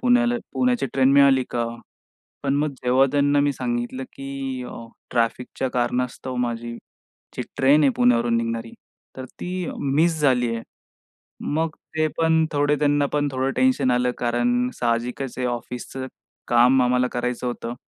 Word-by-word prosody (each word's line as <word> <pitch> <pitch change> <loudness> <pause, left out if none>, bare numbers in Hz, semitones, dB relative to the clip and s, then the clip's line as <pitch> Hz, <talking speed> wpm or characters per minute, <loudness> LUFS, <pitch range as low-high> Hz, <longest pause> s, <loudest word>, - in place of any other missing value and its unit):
पुण्याला 245 -1 +3 0.2
पुण्याची 250 - +1
ट्रेन 135 0 +4
मिळाली 140 -2 +5
का?" 120 -1 -1 0.8
पण 140 - +1
मग 150 +1 +1
जेव्हा 130 +2 +4
त्यांना 145 0 +3
मी 145 0 +2
सांगितलं, 120 +1 -3
की 135 -2 -5
अ, 115 - -9 0.3
ट्रॅफिकच्या 125 +2 -1
कारणास्तव 125 +1 -2
माझी 120 -1 -3 0.6
जी - - -2 0.2
ट्रेन 145 +3 +5
आहे 140 - +5
पुण्यावरून 120 -1 +3
निघणारी 115 0 -3 0.5
तर 130 - -5
ती 180 -1 -3
मिस 155 +4 +1
झाली 125 -4 +3
आहे. 115 - -4 0.8
मग 160 +2 0 0.3
ते 155 0 +2
पण 160 -1 +3
थोडे 145 0 +2
त्यांना 145 -1 +2
पण 145 -1 +1
थोडं 130 +1 -1
टेन्शन 255 - +3
आलं 125 0 +2
कारण 120 +1 +1
साहजिकच 120 +2 -1
आहे, 125 -1 0
ऑफिसचं 125 +2 -5 0.4
काम 125 +2 +5
आम्हाला 125 0 +2
करायचं 125 0 -2
होतं. 120 -1 -4
130 Hz, 145 wpm, -23 LUFS, 120-145 Hz, 0.8 s, मिळाली